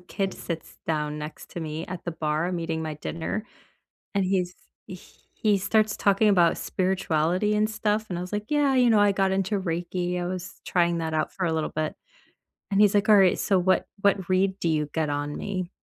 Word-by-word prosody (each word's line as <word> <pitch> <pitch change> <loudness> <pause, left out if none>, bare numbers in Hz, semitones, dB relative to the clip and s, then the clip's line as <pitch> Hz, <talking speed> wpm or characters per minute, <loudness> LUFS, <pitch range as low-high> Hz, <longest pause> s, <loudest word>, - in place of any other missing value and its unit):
kid 190 +2 -3
sits 170 -2 -7
down 150 -1 -1
next 150 +1 -8
to 170 - -6
me 155 +1 -4
at 180 -1 -7
the 170 - -3
bar, 155 +1 -1
I'm 180 -2 -2
eating 165 -1 -2
my 155 -1 -4
dinner, 165 +8 -4 0.7
and 195 -1 +2
he's 185 -1 0 0.9
he 210 -2 +4
starts 215 +2 +1
talking 200 +1 +3
about 175 -4 +4
spirituality 185 +1 0
and 215 +1 +2
stuff, 215 0 0
and 175 - -2
I - - -3
was 180 - -6
like, 210 0 -2
"Yeah, 290 -2 +3
you 250 -2 +4
know, 215 - +5
I 205 -1 +5
got 195 -1 +1
into 195 +1 0
Reiki. 175 0 -2
I 175 - -2
was 185 0 -6
trying 170 -1 +2
that 160 -1 -2
out 155 - 0
for 185 -2 -2
a 165 - 0
little 160 - -1
bit." 155 0 -2 0.8
And 200 0 +1
he's 210 -1 +6
like, 205 +1 +2
"Alright, 195 -3 +6
so 195 -3 +2
what 185 +1 +2
what 195 -2 +2
read 190 +1 +2
do 170 - 0
you 150 -2 0
get 160 -2 0
on 145 0 -2
me?" 185 -2 -4
185 Hz, 210 wpm, -26 LUFS, 165-200 Hz, 0.9 s, he's